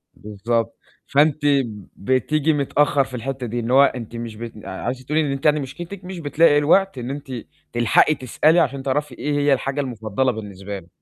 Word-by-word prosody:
بالضبط. 110 +3 -2 0.3
فأنتِ 145 +1 +2
ب 120 -9 0
بتيجي 140 +7 +1
متأخَّر 145 0 +2
في 130 - -12
الحتّة 130 +2 -4
دي، 120 +2 -3
إن 120 +1 -3
هو 135 +2 +7
أنتِ 120 -4 -2
مش 115 -1 -6
بت 115 +1 -8
آآ - - -6
عايزة 130 +1 -4
تقولي 150 +4 +1
إن 145 -3 -1
أنتِ 135 +1 -5
يعني 150 0 +4
مشكلتِك 175 +8 -7
مش 185 -1 -6
بتلاقي 150 0 +4
الوقت 165 +4 +3
إن 125 0 -5
أنتِ 140 0 -6 0.4
تلحقي 120 +6 +4
تسألي 155 +6 +2
عشان 135 -2 0
تعرفي 140 0 -1
إيه 150 - -2
هي 145 0 +3
الحاجة 135 +2 -1
المُفضَّلة 120 0 -1
بالنسبة 100 -3 -7
له. 85 - -18
135 Hz, 190 wpm, -22 LUFS, 120-145 Hz, 0.4 s, هو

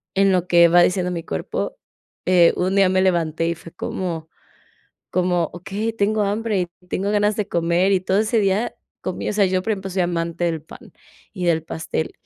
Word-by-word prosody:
en 195 0 +4
lo 180 -1 +1
que 170 -1 +6
va 175 +1 +5
diciendo 180 0 +1
mi 170 -2 -4
cuerpo, 80 - -4 0.5
eh, 180 -2 +5
un 185 +2 0
día 195 -2 +5
me 185 0 +2
levanté 165 -3 +1
y 170 - -1
fue 165 0 -13
como 170 -2 -4 0.8
como: 180 -2 +1
"Okey, 200 +6 -4
tengo 215 0 +1
hambre 205 0 0
y - - -3 0.2
tengo 195 +3 -1
ganas 210 0 +2
de 210 -2 -2
comer", 170 +2 +1
y 190 - +4
todo 190 +1 +1
ese 220 +2 +1
día 200 +3 0 0.3
comí, - - -4
o - - 0
sea, 205 -1 +3
yo, 185 0 +1
por 220 - 0
ejemplo, 195 -2 -5
soy 185 0 0
amante 170 0 -2
del 165 -3 -1
pan 160 - -14 0.4
y 180 -3 -3
del 165 -2 +2
pastel, 160 -1 -4
185 Hz, 200 wpm, -21 LUFS, 170-200 Hz, 0.8 s, que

